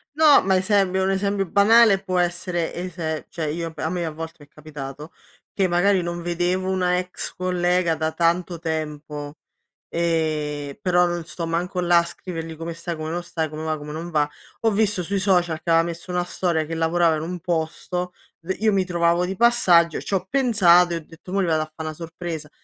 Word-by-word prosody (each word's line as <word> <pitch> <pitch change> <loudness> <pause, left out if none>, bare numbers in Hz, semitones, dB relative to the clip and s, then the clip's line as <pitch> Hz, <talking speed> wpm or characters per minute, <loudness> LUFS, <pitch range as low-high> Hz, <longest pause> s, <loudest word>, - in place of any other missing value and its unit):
No, 305 -2 +7
ma 190 0 +3
esempio 190 -1 +2
un 190 - +1
esempio 200 0 0
banale 205 0 +5
può 185 -2 0
essere 175 -1 -1
ese 170 -3 -4
cioè, 160 -3 -3
io 165 +2 -3
a 160 - -2
me 175 0 -2
a 160 - -3
volte 160 +1 -7
m'è 145 - -19
capitato 150 0 -9 0.4
che 195 -2 +2
magari 185 +2 +3
non 175 0 -4
vedevo 175 +2 -1
una 180 -1 +1
ex 180 0 -5
collega 180 -2 +1
da 160 0 -1
tanto 170 +1 0
tempo, 150 -2 -4 0.5
ehm, 155 -4 -1
però 180 -1 +3
non 175 -1 -3
sto 170 0 -5
manco 175 +3 -2
là 175 -1 +5
a - - +1
scrivergli 165 -2 -7
come 165 +1 -5
stai, 170 +1 -5
come 155 0 -4
non 175 +1 -3
stai, 165 -2 -2
come 155 +1 -6
va, 155 -1 -1
come 150 0 -8
non 165 +2 -5
va. 150 -2 +2 0.3
Ho 225 - +3
visto 210 -2 +1
sui 200 +3 -1
social 175 -5 +1
che 165 - -6
aveva 165 0 +5
messo 170 +2 -6
una 180 0 0
storia 170 -3 -1
che 165 +2 -5
lavorava 165 0 +2
in - - -4
un 180 +2 -5
posto, 175 +2 -2 0.3
v 180 +3 -2
io 215 0 +3
mi 195 -1 +2
trovavo 170 0 +2
di 190 +2 -3
passaggio, 180 -9 +4
ci - - -6
ho 185 0 -2
pensato 185 -10 +4
e - - 0
ho 160 - -9
detto 165 +3 -13
mò 200 - +1
gli - - +1
vado 160 -2 +1
a 155 - -12
fa' 160 - -7
una 155 0 -4
sorpresa. 165 -1 -6
175 Hz, 205 wpm, -23 LUFS, 160-185 Hz, 0.5 s, No